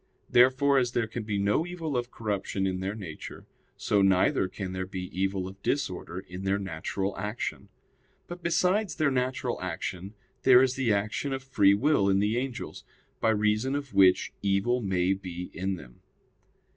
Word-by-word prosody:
Therefore 130 +3 +5
as 125 -1 -1
there 120 - +1
can 110 +2 -5
be 105 -1 -2
no 100 +9 +2
evil 165 -4 -4
of 120 0 -1
corruption 100 -4 -2
in 95 -1 -1
their 95 +2 -3
nature; 90 -8 -8 0.3
so 100 -1 +2
neither 95 -1 +3
can 95 0 -6
there 95 0 -4
be 90 -1 -6
evil 95 0 -1
of 95 +1 -11
disorder 95 -10 -2
in 90 +1 -9
their 95 +1 +1
natural 95 +1 -3
action. 105 +4 -4 0.6
But 175 0 -8
besides 185 +4 +1
their 155 -4 +2
natural 130 0 -1
action 95 +3 -5 0.3
there 130 0 +7
is 130 -1 +2
the 130 -4 0
action 105 +7 -1
of 135 0 -4
free 100 -7 +4
will 105 -4 +2
in 95 - +3
the 105 +3 +1
angels, 130 -1 -5 0.4
by 115 - +2
reason 105 +5 +1
of 140 -2 -5
which 95 -1 +4
evil 100 +5 +1
may 95 -2 +1
be 90 -2 -7
in 95 +1 -2
them. 60 -8 -13
105 Hz, 170 wpm, -28 LUFS, 95-130 Hz, 0.6 s, there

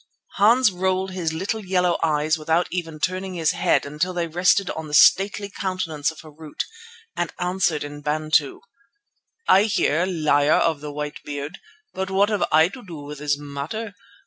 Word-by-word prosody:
Hans 225 +3 +5
rolled 190 +1 -1
his 175 -4 -2
little 195 +7 -3
yellow 180 -2 +1
eyes 155 -1 +1
without 160 +2 0
even 165 -3 -4
turning 185 +2 -2
his 165 -3 +2
head - - +1
until 150 +6 -2
they 175 -1 -1
rested 180 +4 +2
on 160 -1 -6
the 150 - -2
stately 195 +6 +5
countenance 185 -7 -2
of 160 - -10
Harût, 155 -1 -7 0.5
and 175 -1 -2
answered 180 -3 0
in 145 0 -8
Bantu: 150 -1 0 0.9
"I 195 +2 +6
hear, 180 -5 +1
Liar 155 -4 +3
with 155 -3 -5
the 150 -1 -6
White 150 0 -5
Beard, 145 +1 -6 0.3
but 190 0 -3
what 195 +2 +2
have 210 -3 +1
I 160 +1 +6
to 245 +5 -11
do 170 -5 -9
with 145 0 -8
this 145 -1 0
matter? 145 +10 -6
165 Hz, 170 wpm, -23 LUFS, 150-190 Hz, 0.9 s, I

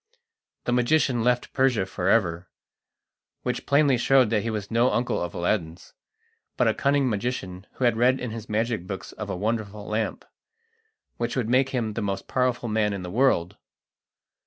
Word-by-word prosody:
The - - -1
magician 125 -1 +2
left 125 0 +1
Persia 130 -7 +2
for 95 -1 -2
ever, 90 -5 +1 0.9
which - - -3
plainly 140 -3 +4
showed 130 -2 +4
that 110 -2 +2
he 115 - -3
was 105 -1 -4
no 120 +3 +3
uncle 120 +1 0
of 85 0 -4
Aladdin's, 85 -2 -2 0.6
but - - +3
a - - +3
cunning 140 -1 +2
magician 105 -4 -3
who - - -5
had 120 -2 +3
read 125 +3 +3
in 125 - -4
his 115 -1 -7
magic 110 -3 -1
books 95 -1 -6
of - - -7
a - - -3
wonderful 105 0 -3
lamp, 110 +1 -2 0.9
which 120 - -2
would 120 -4 -1
make 130 +2 +3
him 115 -5 -2
the 115 - -3
most 100 -1 -3
powerful 125 -1 0
man 105 -2 +1
in 95 -2 -5
the 90 - -6
world. 110 -7 +2
115 Hz, 175 wpm, -25 LUFS, 100-125 Hz, 0.9 s, plainly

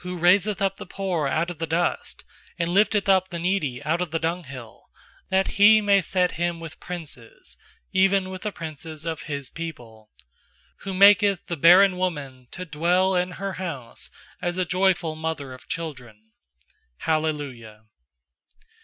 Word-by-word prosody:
raiseth 180 +3 +2
up 195 0 0
the - - -8
poor 180 -6 -2
out 165 +5 0
of 165 - -10
the 165 - -2
dust, 170 +2 -2 0.3
And 170 -1 -1
lifteth 205 +1 +3
up 190 -1 +3
the 175 - -5
needy 170 -8 -1
out 165 +3 0
of 180 - -2
the 165 - -1
dunghill; 155 -8 -5 0.4
8That 190 0 +2
He 215 +2 +8
may 200 -2 +3
set 180 +1 +1
him 175 -1 0
with 165 -2 -9
princes, 145 - -9 0.4
Even 190 0 +2
with 185 -1 -7
the 210 - -3
princes 155 -2 -8
of 165 -2 -3
His 140 -3 -4
people. 120 -10 -8 0.7
Who 195 -1 -6
maketh 200 0 +5
the 170 - -3
barren 180 +4 +6
woman 140 -9 -4
to 185 - -7
dwell 175 +4 +1
in 180 0 0
her 195 +1 -4
house 135 -10 -6 0.3
As 175 0 -2
a 185 - +1
joyful 185 -3 +1
mother 155 -4 -4
of 130 - -14
children. 125 -10 -7 0.7
Hallelujah. 145 -9 -2
170 Hz, 155 wpm, -24 LUFS, 150-185 Hz, 0.7 s, He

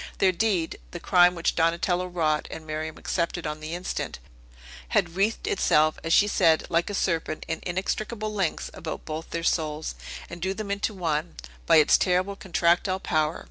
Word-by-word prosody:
Their 190 - +4
deed 185 -3 0
the 175 - -7
crime 180 0 +5
which 170 - 0
Donatello 175 +2 +1
wrought, 160 -4 0
and 160 - -8
Miriam 155 0 -4
accepted 170 -1 -2
on 150 0 -3
the 155 +2 -5
instant 180 +1 -4 0.7
had 175 - +1
wreathed 210 - 0
itself, 155 - +2
as 165 - -3
she 205 - +6
said, 165 -6 +3
like 170 +2 +1
a 205 - -3
serpent, 165 -4 -1
in 160 0 -2
inextricable 215 +4 -3
links 190 -6 -2
about 160 - -6
both 160 +1 -5
their 170 - -3
souls, 155 -2 -1 0.3
and 170 - -9
drew 190 +2 -1
them 205 -1 -5
into 200 +1 -1
one, 165 -2 -2 0.3
by 165 - +6
its 155 -2 +6
terrible 185 +2 +1
contractile 180 +1 +1
power. 155 -3 0
175 Hz, 175 wpm, -26 LUFS, 160-190 Hz, 0.7 s, she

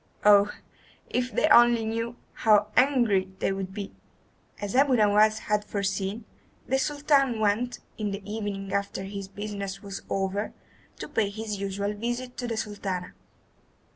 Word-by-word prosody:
Oh, 205 0 +7 0.6
if 250 0 0
they - - +2
only 235 -1 +6
knew, 230 +2 -2 0.2
how 210 -2 +4
angry 240 -8 +3
they - - 0
would 195 -1 -4
be!" 200 0 -6 0.7
As 205 +1 -4
Abu 270 0 +5
Nowas 215 0 +4
had 210 0 0
foreseen, 200 +2 -2 0.4
the 265 +1 +2
Sultan 280 -4 +2
went, 220 +4 +1 0.2
in 210 -1 -1
the 200 0 -6
evening 205 -2 -4
after 200 -1 -2
his 195 0 -6
business 200 -1 -6
was 200 -1 -6
over, 195 +2 -1 0.4
to - - -6
pay 210 -3 0
his 210 0 -5
usual 200 +1 -2
visit 240 +4 -4
to 245 - -3
the 230 -2 -3
Sultana. 200 -4 -4
210 Hz, 145 wpm, -27 LUFS, 200-235 Hz, 0.7 s, Oh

